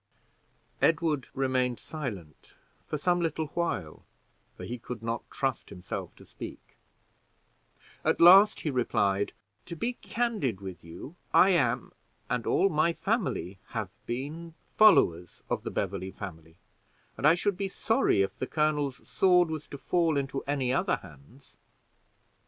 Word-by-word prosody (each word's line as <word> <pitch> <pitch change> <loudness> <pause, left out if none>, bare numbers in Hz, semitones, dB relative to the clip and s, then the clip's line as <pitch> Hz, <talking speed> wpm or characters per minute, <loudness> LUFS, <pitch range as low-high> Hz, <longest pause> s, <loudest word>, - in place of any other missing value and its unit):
Edward 160 -4 +2
remained 130 -2 0
silent 105 - -7 0.3
for 150 - -2
some 175 +4 +1
little 160 -2 -1
while, 100 - -3 0.5
for - - -8
he 120 +1 -5
could 115 -1 -7
not 115 +1 -3
trust 135 -2 -2
himself 90 -3 -6
to - - -16
speak; - - -10 1.3
at - - +1
last 190 +5 +8
he 150 - -1
replied: 100 -6 +1 0.4
"To 170 - -5
be 235 +10 -2
candid 220 - -2
with 95 -2 -8
you, 85 - -10 0.2
I 190 - +7
am, 125 -8 +1 0.4
and 125 -2 -1
all - - +3
my 165 -1 +2
family 165 - -2 0.2
have - - -3 0.2
been, 155 +7 -5
followers 90 - +3
of - - 0
the - - -5
Beverley 95 -1 -3
family, 80 -5 -9 0.6
and 145 - +2
I 160 - +7
should 195 +2 0
be 195 +1 -2
sorry 210 - +2
if 95 0 -5
the 130 - -2
colonel's 150 -3 -1
sword 180 -3 +4
was 155 -1 -5
to 140 - -8
fall 165 0 +1
into 135 0 -2
any 135 -3 0
other 135 - +2
hands. 80 - -15
140 Hz, 140 wpm, -29 LUFS, 105-170 Hz, 1.3 s, last